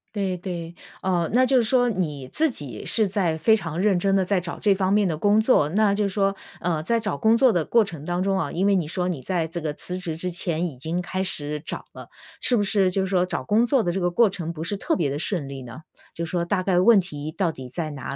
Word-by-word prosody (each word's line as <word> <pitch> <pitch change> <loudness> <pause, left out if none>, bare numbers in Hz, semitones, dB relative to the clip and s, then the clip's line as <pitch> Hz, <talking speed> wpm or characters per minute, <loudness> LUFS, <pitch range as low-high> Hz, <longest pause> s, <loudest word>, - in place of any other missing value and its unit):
对， 190 -3 -1
对。 170 -2 -6 0.3
哦， 175 -3 0
那 255 +2 +5
就 260 0 +3
是 245 - +4
说 245 +2 +3
你 150 - -3
自 320 0 +2
己 135 - -6
是 220 -3 +2
在 185 -5 0
非 220 +8 +4
常 165 -6 -4
认 205 -3 +3
真 195 +2 +1
地 190 - +3
在 190 +1 +1
找 175 -1 -6
这 205 -2 +3
方 190 0 +1
面 210 -1 +3
的 160 -3 -2
工 205 +4 +3
作， 220 - +3
那 205 +3 +2
就 210 - 0
是 200 - 0
说， 195 0 +1 0.3
呃， 165 -3 0
在 230 +7 +1
找 210 -10 -3
工 220 +6 +4
作 255 +1 +5
的 175 -6 0
过 230 -1 +4
程 165 -7 -8
当 175 0 -1
中 195 0 +1
啊， - - -2
因 190 +4 0
为 200 - +4
你 170 -5 0
说 180 +2 -1
你 160 -7 -4
在 170 -1 -1
这 170 +2 -5
个 155 -2 -3
辞 180 +4 -3
职 175 -4 -4
之 180 +3 -3
前 175 -1 -1
已 140 - -9
经 160 +7 -3
开 185 +1 -3
始 150 -5 -2
找 - - -6
了， - - -10 0.3
是 245 - +3
不 205 - +2
是 195 -2 +2
就 195 - 0
是 190 - -1
说 180 -1 +2
找 175 -1 -4
工 220 +3 +3
作 255 0 +2
的 175 - -1
这 190 - -2
个 175 -1 0
过 225 +2 +4
程 170 -3 -5
不 160 -1 -6
是 200 +4 -3
特 - - 0
别 160 -6 0
地 140 - -3
顺 155 -4 -2
利 135 -1 -7
呢？ 125 +6 -10 0.3
就 170 - -4
说 170 0 -1
大 185 +1 0
概 180 -1 +2
问 210 +2 +6
题 155 -4 -5
到 175 -1 0
底 130 -4 -9
在 155 +5 -4
哪 140 -1 -6
180 Hz, 300 characters per minute, -24 LUFS, 165-200 Hz, 0.3 s, 问